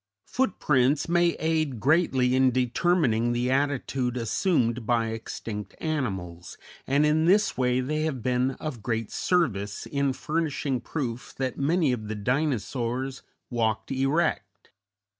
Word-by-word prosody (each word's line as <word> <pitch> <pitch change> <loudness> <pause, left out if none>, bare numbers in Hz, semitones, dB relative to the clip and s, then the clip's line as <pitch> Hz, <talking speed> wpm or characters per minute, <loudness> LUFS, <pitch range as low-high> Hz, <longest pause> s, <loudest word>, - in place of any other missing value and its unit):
Footprints 145 - +1
may 175 0 +3
aid 155 -6 -1
greatly 130 -2 +3
in 130 0 +5
determining 125 -1 +1
the 120 +1 0
attitude 135 -2 0
assumed 120 - +1
by 115 0 +1
extinct 110 -2 -6
animals, 95 - -3 0.3
and 140 +3 +3
in 155 +1 +3
this 205 +5 +3
way 125 0 +1
they 155 +4 -1
have 135 -7 -3
been 125 +1 +1
of 145 -8 -5
great 115 -1 -2
service 105 - 0
in 140 -1 0
furnishing 145 -2 -2
proof 125 -3 -5
that 130 -2 -2
many 155 +1 +2
of 110 -4 -3
the 110 - -3
Dinosaurs 125 +1 -1 0.3
walked 110 -1 -1
erect. 135 -6 -1
130 Hz, 125 wpm, -26 LUFS, 115-150 Hz, 0.3 s, in